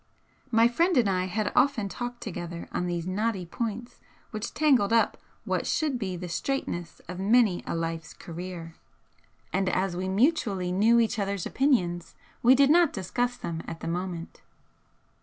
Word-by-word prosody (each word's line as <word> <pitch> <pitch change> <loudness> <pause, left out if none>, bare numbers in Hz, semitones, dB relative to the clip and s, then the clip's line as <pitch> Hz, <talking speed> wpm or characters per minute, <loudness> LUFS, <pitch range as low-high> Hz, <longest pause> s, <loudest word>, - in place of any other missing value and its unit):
My 230 -1 +5
friend 335 +7 +2
and 235 -4 +4
I 185 -1 +1
had 205 +3 -1
often 250 -6 +3
talked 245 +4 -5
together 175 -4 -6
on 180 - -1
these 170 -1 -2
knotty 195 0 -1
points 230 +5 -5 0.3
which 215 0 -4
tangled 270 -10 +3
up 230 0 +3 0.3
what - - -1
should 295 -6 0
be 190 -4 -3
the 180 +1 -6
straightness 175 -3 -3
of 180 +1 -6
many 210 -1 +3
a - - -2
life's 165 -1 -4
career, 170 -1 -7 0.8
and 190 0 +1
as 185 -1 0
we 185 +1 -2
mutually 200 - +1
knew 220 +6 +4
each 225 0 +1
other's 200 -2 -2
opinions 180 - +1 0.3
we 250 +3 +7
did 280 +1 +5
not 340 -1 +5
discuss 245 +6 -1
them 170 -9 -4
at 165 - -7
the - - -5
moment. 175 0 -4
200 Hz, 160 wpm, -27 LUFS, 175-245 Hz, 0.8 s, we